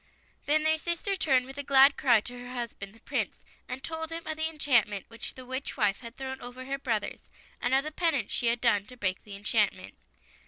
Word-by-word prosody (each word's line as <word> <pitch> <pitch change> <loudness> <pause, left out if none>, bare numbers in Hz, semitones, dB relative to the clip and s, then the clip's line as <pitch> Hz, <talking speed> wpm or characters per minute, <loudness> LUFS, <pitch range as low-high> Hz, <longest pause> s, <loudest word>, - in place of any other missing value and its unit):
Then 305 +1 +4
their 315 0 +3
sister 340 +4 -1
turned 265 -8 +3
with 270 +2 -9
a - - -2
glad 275 0 +7
cry 240 -5 +4
to 245 +3 -7
her 245 0 -8
husband, 235 -5 -5
the 225 - -20
Prince, - - -1 0.3
and 255 +1 -5
told 320 +1 -3
him 330 0 -5
of 315 - -3
the 315 +1 -1
enchantment 240 - +2
which 230 0 -6
the 255 - -9
witch 260 +3 -4
wife 210 -5 +2
had 235 -1 -10
thrown 265 0 -5
over 245 +1 -8
her 275 +1 -3
brothers, 225 -6 -1 0.4
and 245 +2 +2
of 270 - +4
the 305 - -5
penance 310 - 0
she 240 - +1
had 235 +1 +2
done 205 -4 +3
to 250 - -12
break 185 -5 -1
the 205 -2 -9
enchantrnent. 200 +1 0
255 Hz, 225 wpm, -29 LUFS, 235-290 Hz, 0.4 s, glad